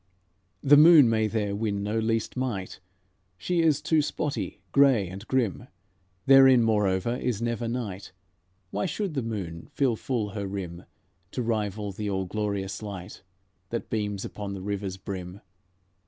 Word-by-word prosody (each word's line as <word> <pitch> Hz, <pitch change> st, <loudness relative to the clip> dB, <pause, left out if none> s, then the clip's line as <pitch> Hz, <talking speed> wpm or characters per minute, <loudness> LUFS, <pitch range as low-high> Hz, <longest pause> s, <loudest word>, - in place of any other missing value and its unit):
The 145 Hz, 0 st, +7 dB
moon 150 Hz, -5 st, +8 dB
may 110 Hz, -1 st, +2 dB
there 105 Hz, -2 st, -1 dB
win 100 Hz, -2 st, -2 dB
no 105 Hz, +2 st, -1 dB
least 115 Hz, 0 st, -1 dB
might, 120 Hz, -8 st, -3 dB, 0.6 s
She 175 Hz, -, 0 dB
is 155 Hz, -4 st, +2 dB
too 160 Hz, -2 st, +3 dB
spotty, 150 Hz, 0 st, -3 dB
grey 135 Hz, -8 st, +4 dB
and 95 Hz, +4 st, -9 dB
grim; 115 Hz, -, 0 dB, 0.6 s
Therein, 135 Hz, -2 st, +7 dB
moreover, 105 Hz, +1 st, +1 dB
is 125 Hz, -5 st, -2 dB
never 120 Hz, 0 st, -2 dB
night, 105 Hz, -5 st, -4 dB, 0.6 s
Why 105 Hz, -, -1 dB
should 200 Hz, -6 st, -3 dB
the 135 Hz, -, -1 dB
moon 95 Hz, -8 st, -5 dB
fill 130 Hz, -5 st, +2 dB
full 110 Hz, -2 st, -2 dB
her 100 Hz, 0 st, -4 dB
rim 90 Hz, -3 st, -6 dB, 0.5 s
To 125 Hz, -, -2 dB
rival 105 Hz, -2 st, -2 dB
the 105 Hz, +2 st, -4 dB
all 95 Hz, -1 st, -1 dB
glorious 100 Hz, 0 st, -3 dB
light 95 Hz, -4 st, -8 dB, 0.5 s
That 115 Hz, -, -4 dB
beams 105 Hz, -3 st, -2 dB
upon 100 Hz, -1 st, -6 dB
the 95 Hz, -, -7 dB
river's 100 Hz, -1 st, -3 dB
brim? 95 Hz, 0 st, -7 dB
105 Hz, 150 wpm, -27 LUFS, 100-125 Hz, 0.6 s, moon